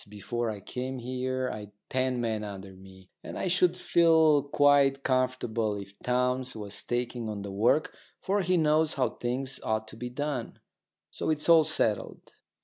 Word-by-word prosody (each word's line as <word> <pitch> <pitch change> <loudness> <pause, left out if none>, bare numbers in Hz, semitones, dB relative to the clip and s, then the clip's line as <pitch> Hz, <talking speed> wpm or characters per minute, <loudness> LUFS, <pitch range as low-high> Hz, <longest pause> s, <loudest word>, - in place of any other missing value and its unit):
Before 110 +3 -3
I 105 -2 -5
came 130 +5 -5
here 130 +1 -2
I'd 105 -1 -8 0.2
ten 130 -1 0
men 110 -2 -1
under 100 -2 -8
me. 95 0 -16
And - - -7
I - - -2
should 180 0 +2
feel 160 -4 +4
quite 140 -1 +3
comfortable 125 -4 0
if 100 0 -9
Townes 125 +1 0
was 105 -2 -4
taking 120 -1 -3
on 105 -2 -5
the 100 - -6
work, 115 +10 +2 0.2
for 200 +1 0
he 185 0 +2
knows 155 0 +2
how 130 -2 +1
things 130 +2 -3
ought 110 0 -1
to - - -11
be 125 +2 -5
done." 135 -2 -4 0.5
So - - -3
it's 155 -1 -1
all 165 -2 +7
settled. 110 -9 -1
125 Hz, 165 wpm, -28 LUFS, 110-145 Hz, 0.5 s, all